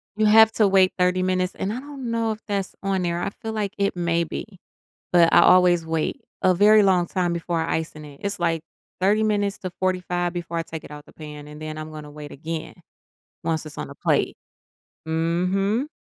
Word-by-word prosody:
You 215 - +2
have 220 +1 +7
to 215 -3 +4
wait 190 -1 +4
30 180 0 +2
minutes, 185 0 0
and 200 +3 -2
I 250 - -4
don't 275 -4 -7
know 230 -1 0
if 215 - -5
that's 200 -2 -2
on 195 -1 0
there, 175 0 -1
I - - -1
feel 220 0 -4
like 210 -1 -2
it 200 -2 +1
may 170 -1 +1
be, 190 +3 -7 0.5
but 170 -2 +5
I - - +8
always 175 -2 +5
wait 160 - -2 0.2
a 185 - +5
very 210 +3 +6
long 180 -3 +3
time 175 -2 0
before 170 0 -2
icing 160 -1 -3
it. 145 -1 -13
It's, 200 -1 -2
like, 165 -2 0 0.4
30 205 +4 +3
minutes 205 -2 0
to 185 - -5
45 180 -1 0
before 170 -1 -4
I - - -1
take 160 -1 -8
it - - -12
out 150 - -8
of 145 - -18
the - - -18
pan, 150 -1 -9
and 150 +1 -10
then 155 0 -5
I'm 155 0 -7
gonna 150 -1 -9
wait 150 0 -9
again 160 +2 -6 0.7
once 160 -1 -1
it's 150 - -11
on - - -4
the - - -10
plate. - - +1 0.7
Mhm. 185 - 0
180 Hz, 215 wpm, -23 LUFS, 165-200 Hz, 0.7 s, I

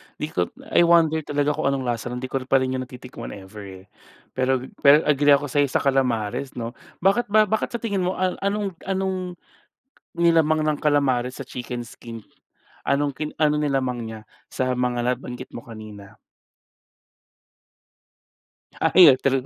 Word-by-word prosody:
'Di 150 - -5
ko 90 -1 0 0.2
I 170 - +5
wonder 165 -2 +4
talaga 145 -1 0
kung 145 - -1
anong 135 -1 0
lasa 120 -1 -2
nun. 125 +1 -5
'Di 130 - -5
ko 135 - 0
pa 135 0 +3
rin 130 - -2
'yun 130 - -2
natitikman 125 0 -9
ever 95 -1 -11
eh. - - -25 0.5
Pero 130 0 +1 0.2
pero 145 +2 +6
agree 145 -1 +5
ako 145 -1 -3
sayo 145 +1 +3
sa 130 - -1
kalamares 130 -2 0
'no. 115 -1 -4 0.3
Bakit 200 +5 +3
ba 215 +1 +5
bakit 220 +3 -2
sa 235 - -2
tingin 200 -5 -1
mo 185 - -1
anong 200 +2 -1 0.2
anong 190 -2 -2 0.8
nilamang 160 -2 +3
ng 155 -1 0
kalamares 130 -4 +1
sa - - -6
chicken 125 -1 -6
skin? 115 -1 -10 0.6
Anong 140 0 0
ki 150 +1 -4
anong 150 -1 +2
nilamang 130 -4 -1
niya 110 -1 -9 0.2
sa 130 -1 -1
mga 125 -1 -1 0.2
nabanggit 125 0 -8
mo 120 - -7
kanina? 110 -3 -11 2.6
Ay, 170 -7 +8
true. 135 -1 +1
140 Hz, 155 wpm, -23 LUFS, 125-160 Hz, 2.6 s, Ay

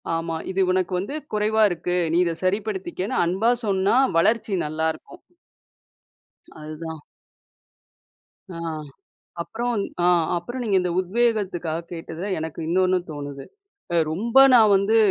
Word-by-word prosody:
ஆமா. 165 0 -3 0.2
இது 190 +1 0
உனக்கு 185 0 0
வந்து 205 +10 -4 0.2
குறைவா 215 +1 +1
இருக்கு. 175 +1 -2 0.2
நீ 170 - +3
இதை 170 -1 -1
சரிப்படுத்திக்கன்னு 190 -1 -2
அன்பா 190 +7 +2
சொன்னா, 195 +2 +2 0.2
வளர்ச்சி 215 +2 +2
நல்லா 155 +1 -1
இருக்கும். 350 - -16 1.4
அதுதான். 155 0 -7 1.5
ஆ. 170 - -8 0.9
அப்பறம் 240 +6 -3
இந் 200 - -1 0.2
ஆ - - +4 0.3
அப்பறம் 240 +9 -5
நீங்க 205 -4 +1
இந்த 180 - -1
உத்வேகத்துக்காக 185 -5 -1
கேட்டதுல, 170 +3 -6
எனக்கு 160 +1 -5
இன்னொன்னு 185 +1 +2
தோணுது. 145 -2 -7 0.5
அ - - +2 0.2
ரொம்ப 230 +9 +1 0.2
நான் 220 -4 +6
வந்து 200 +4 +2
185 Hz, 125 wpm, -23 LUFS, 165-215 Hz, 1.5 s, நான்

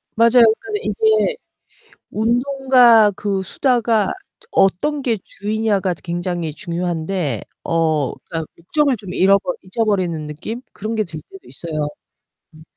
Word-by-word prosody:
맞아요. 235 +1 +6 0.2
근데 415 +1 -4
이게 440 +1 +2 0.8
운동과 245 -1 +4
그 195 -2 -1
수다가 230 -1 +1 0.3
저 455 - -23
어떤 270 - +2
게 230 -5 0
주이냐가 205 -3 -1
굉장히 175 -2 -3
중요한데 170 - -2 0.2
어 160 -5 +1
그러니까 165 -2 -6
목적을 275 - +1
좀 190 -3 -8
잃어버 195 -1 +3
잊어버리는 185 -6 -1
느낌 170 +11 -6
그런 220 +3 -4
게 215 -1 0
들 160 -3 -8
때도 385 -1 -14
있어요. 155 -3 -4 0.7
음. 155 - -15
200 Hz, 275 characters per minute, -19 LUFS, 170-240 Hz, 0.8 s, 맞아요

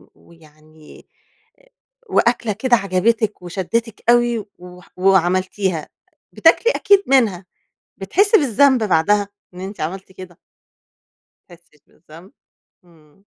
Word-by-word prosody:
ويعني 155 -1 -20 1.0
وأكلة 235 - +1
كده 240 +4 +1
عجبتك 210 +2 -1
وشدتك 205 +6 -4
أوي 240 -3 +2
وح 180 0 -15
وعملتيها، 185 -1 0 0.4
بتاكلي 480 - +3
أكيد 400 -1 +3
منها، 220 -9 +1 0.5
بتحسّي 400 - +2
بالذنب 265 -2 +2
بعدها 205 +2 +1 0.3
إن 180 - -12
أنتِ 190 0 -8
عملتِ 190 +4 -6
كده؟ 185 -1 -13 1.1
بتحسيش 170 -4 -21
بالذنب. 165 +4 -18 0.5
امم. 165 +2 -26
190 Hz, 95 wpm, -19 LUFS, 175-230 Hz, 1.1 s, بتاكلي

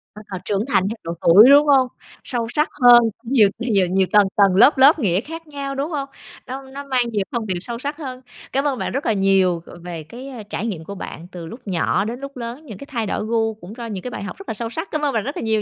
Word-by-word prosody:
Ờ, 205 -3 -8
trưởng 205 +2 -1
thành 195 -8 +2
theo 225 - -4
độ 165 - -4
tuổi, 205 +9 +8
đúng 290 +1 +7
hông? 265 -3 +5 0.4
Sâu 235 -3 -3
sắc 300 +6 +1
hơn, 240 -1 +9 0.2
nhiều 230 -4 +4
nhiều 205 -7 +2
nhiều 190 +1 +2
tầng 205 -2 +5
tầng, 200 -3 +4
lớp 270 +9 +6
lớp 280 +5 +6
nghĩa 195 - +1
khác 325 +3 -9
nhau, 280 -2 -5
đúng 280 +4 -2
hông? 275 -3 -3 0.4
Nó 260 +2 -5
nó 270 +1 -9
mang 260 -3 +1
nhiều 205 -3 0
thông 235 -3 -3
điệp 185 -3 -2
sâu 235 +3 -6
sắc 285 +2 -4
hơn. 260 -5 -7 0.3
Cám 275 +2 0
ơn 270 - -1
bạn - - -2
rất 275 +3 -3
là - - +2
nhiều, 190 -3 +2
ờ, 175 - -12
về 170 -3 -6
cái, 250 - -10
a, 240 -5 -8
trải 210 +2 -5
nghiệm 175 -7 -4
của 200 +5 -8
bạn 170 -2 -8
từ 175 -2 -8
lúc 230 +10 -9
nhỏ 185 +2 0
đến 235 +3 -5
lúc 275 -1 -8
lớn, 240 +6 -7
những 215 -7 -9
cái 280 - -11
thay 235 -6 -2
đổi 210 - -2
gu 225 0 0
cũng 210 -1 -12
ro 235 - -6
những 200 -5 -6
cái 250 - -5
bài 200 - -6
học - - -7
rất 390 - -12
là - - -1
sâu 230 +1 -5
sắc. 320 +10 -6
Cám 305 - -2
ơn 285 -2 0
bạn 220 -3 0
rất 280 - -5
là - - -3
nhiều 220 -1 +1
235 Hz, 280 wpm, -21 LUFS, 200-275 Hz, 0.4 s, hơn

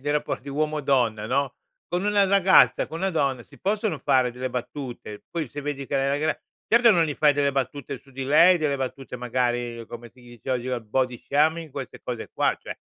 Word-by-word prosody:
dei 145 +2 -1
rapporti 145 -2 -2
uomo-donna 135 -7 0
no, 135 +2 0 0.3
con 175 +3 -2
una 205 -1 +3
ragazza, 190 -1 +5
con 165 - -7
una 195 0 +1
donna 140 -7 0
si - - -18
possono 210 +2 -1
fare 130 -3 +2
delle 125 +1 -4
battute. 125 -4 -6
Poi 165 -5 -3
se 145 - -7
vedi 140 -1 -4
che - - -4
uhm, 135 0 +1
la 140 +1 0
gra 155 +1 0 0.3
certo 235 +1 +5
che 220 - +7
non 170 -2 +4
gli 150 -2 -3
fai 150 0 +4
delle 140 -1 +1
battute 135 0 -3
su 135 - -22
di 135 0 -5
lei, 165 +6 +6
delle 150 -3 0
battute, 135 -1 -5
magari, 120 -1 -2
come 120 0 -9
si 125 - -21
dice 120 +1 -9
oggi, 125 0 -1
al 125 -2 -2
body 125 +2 -1
shaming, 160 +3 +2
queste 135 -3 -7
cose 120 -2 -5
qua, - - +1
cioè - - -7
140 Hz, 215 wpm, -25 LUFS, 125-155 Hz, 0.3 s, che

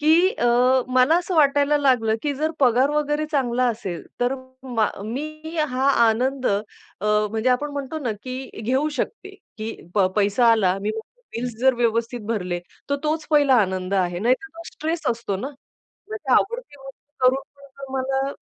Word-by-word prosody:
की 320 +5 +5
अ, - - -2 0.4
मला 255 +5 +4
असं 355 +1 -3
वाटायला 285 -1 +4
लागलं 245 -6 +3
की 290 -1 0
जर 310 +3 -1
पगार 255 +2 +4
वगैरे 300 0 0
चांगला 255 -4 +1
असेल, 195 -7 -4 0.2
तर 245 +2 +2 0.3
मा 240 -5 0 0.2
मी 310 +7 -6
हा 260 +1 +1 0.2
आनंद 255 +4 0
अ, 200 - +3 0.5
म्हणजे 210 +2 +1
आपण 290 +4 0
म्हणतो 285 +2 -4
ना 250 -7 -2
की 255 -2 -7
घेऊ 260 +7 +1
शकते 395 -3 -4 0.2
की 220 +1 -4 0.2
प 200 -3 +4
पैसा 210 +4 +4
आला. 195 -4 +2
मी 210 - -1 0.5
बिल्स 245 0 -3
जर 260 -1 +4
व्यवस्थित 235 0 0
भरले, 180 -6 -1 0.3
तर 280 - +2
तोच 310 +1 -1
पहिला 290 -3 +5
आनंद 190 0 -1
आहे. 180 -2 0
नाहीतर 255 - +1
तो 335 - -8
स्ट्रेस 320 0 -3
असतो 230 -4 -3
ना. 250 +8 -4 0.6
म्हणजे 425 -12 -3
आवडती 470 - +1
गोष्ट 270 +1 -14
करून 260 +2 +4
पण 280 0 -16 0.2
तुम्हाला 270 +1 -1
260 Hz, 165 wpm, -23 LUFS, 225-295 Hz, 0.6 s, की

